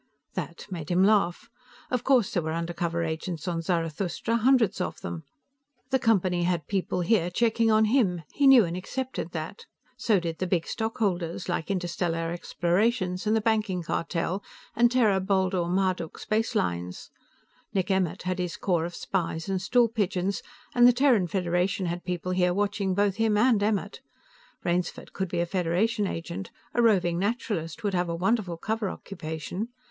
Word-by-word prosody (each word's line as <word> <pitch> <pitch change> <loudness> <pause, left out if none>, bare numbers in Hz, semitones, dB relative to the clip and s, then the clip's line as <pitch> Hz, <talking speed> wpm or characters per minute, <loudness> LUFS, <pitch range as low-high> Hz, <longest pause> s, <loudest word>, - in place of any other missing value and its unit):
That - - -5
made 165 -5 -5
him 180 +1 +3
laugh. 195 -4 +2 0.4
Of 250 -1 0
course 255 -7 +3
there 175 - +1
were 160 0 -3
undercover 170 0 -2
agents 160 +1 -4
on 170 -2 -1
Zarathustra, 170 +6 -1
hundreds 235 -5 +3
of - - -3
them. 160 -3 -6 0.7
The 265 - +3
Company 185 -7 +2
had 175 -3 0
people 190 -1 -1
here 175 -1 +2
checking 225 +4 +2
on 220 0 +5
him; 210 -8 +2
he 285 - +3
knew 260 -6 +8
and 170 0 -4
accepted 250 +1 -4
that. 160 +4 -6 0.3
So 215 -4 +2
did 165 -2 -4
the 185 - -1
big 175 -2 +1
stockholders, 190 -7 -2
like 175 -3 -2
Interstellar 175 -3 -1
Explorations 180 +3 0
and 215 - +3
the 220 - +2
Banking 215 -5 0
Cartel 170 +3 -2 0.3
and 240 0 +4
Terra 220 -6 +3
Baldur 190 -2 +1
Marduk 185 -2 0
Spacelines. 90 - -2 0.6
Nick 195 0 0
Emmert 190 -3 0
had 185 +1 -2
his 180 -1 -3
corps 175 -4 0
of 175 - -6
spies 165 -3 -2
and 190 -1 -1
stool 240 +4 +4
pigeons, 200 -3 -1 0.3
and 245 0 +7
the 245 - +6
Terran 245 -7 +3
Federation 180 +1 0
had 175 +1 -3
people 180 0 -3
here 180 -1 +2
watching 200 -1 0
both 200 0 +1
him 220 -2 +2
and 225 -1 +4
Emmert. 205 -1 -1 0.6
Rainsford 175 +1 -2
could 190 -2 -2
be 170 - 0
a - - +1
Federation 190 +5 0
agent 170 +2 -5 0.2
a 240 - +2
roving 180 -7 +3
naturalist 195 -7 -2
would 205 -2 0
have 175 -1 0
a 170 - -1
wonderful 185 -1 0
cover 220 +2 -2
occupation. 175 +3 -5
185 Hz, 165 wpm, -27 LUFS, 175-215 Hz, 0.7 s, knew